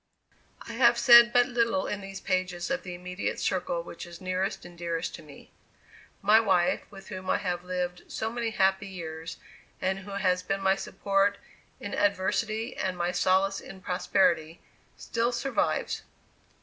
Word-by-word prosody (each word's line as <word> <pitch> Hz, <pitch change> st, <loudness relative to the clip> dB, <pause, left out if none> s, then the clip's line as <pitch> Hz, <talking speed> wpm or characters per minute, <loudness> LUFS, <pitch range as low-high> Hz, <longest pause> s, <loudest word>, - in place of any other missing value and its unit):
I 230 Hz, -, -6 dB
have 235 Hz, 0 st, +5 dB
said 235 Hz, 0 st, +8 dB
but 245 Hz, 0 st, +5 dB
little 240 Hz, +2 st, +1 dB
in 205 Hz, -1 st, -3 dB
these 195 Hz, 0 st, -7 dB
pages 185 Hz, +2 st, -2 dB
of 270 Hz, -, 0 dB
the 180 Hz, -1 st, -7 dB
immediate 180 Hz, +1 st, -4 dB
circle 175 Hz, -2 st, -1 dB
which 170 Hz, 0 st, -9 dB
is 170 Hz, -1 st, -11 dB
nearest 185 Hz, +2 st, -2 dB
and 175 Hz, 0 st, -12 dB
dearest 170 Hz, 0 st, -3 dB
to -, -, -8 dB
me. 150 Hz, -3 st, -15 dB, 0.7 s
My 210 Hz, +2 st, +7 dB
wife, 185 Hz, -6 st, +2 dB
with 195 Hz, -1 st, -12 dB
whom 185 Hz, -1 st, -6 dB
I -, -, +3 dB
have 175 Hz, -2 st, -3 dB
lived 180 Hz, -1 st, -3 dB
so 220 Hz, +1 st, -2 dB
many 235 Hz, -1 st, -2 dB
happy 195 Hz, -1 st, +1 dB
years, 165 Hz, -3 st, -7 dB, 0.4 s
and 190 Hz, +1 st, -1 dB
who 195 Hz, +1 st, -9 dB
has 185 Hz, -2 st, +1 dB
been 195 Hz, +2 st, -2 dB
my 190 Hz, 0 st, +3 dB
support 195 Hz, +1 st, 0 dB, 0.4 s
in 200 Hz, -, -6 dB
adversity 215 Hz, +4 st, 0 dB
and 185 Hz, -1 st, -2 dB
my 175 Hz, 0 st, 0 dB
solace 190 Hz, +2 st, +2 dB
in 190 Hz, -, -11 dB
prosperity, 170 Hz, -3 st, +1 dB, 0.4 s
still 235 Hz, +1 st, -1 dB
survives. 270 Hz, +2 st, -1 dB
190 Hz, 160 wpm, -28 LUFS, 180-210 Hz, 0.7 s, said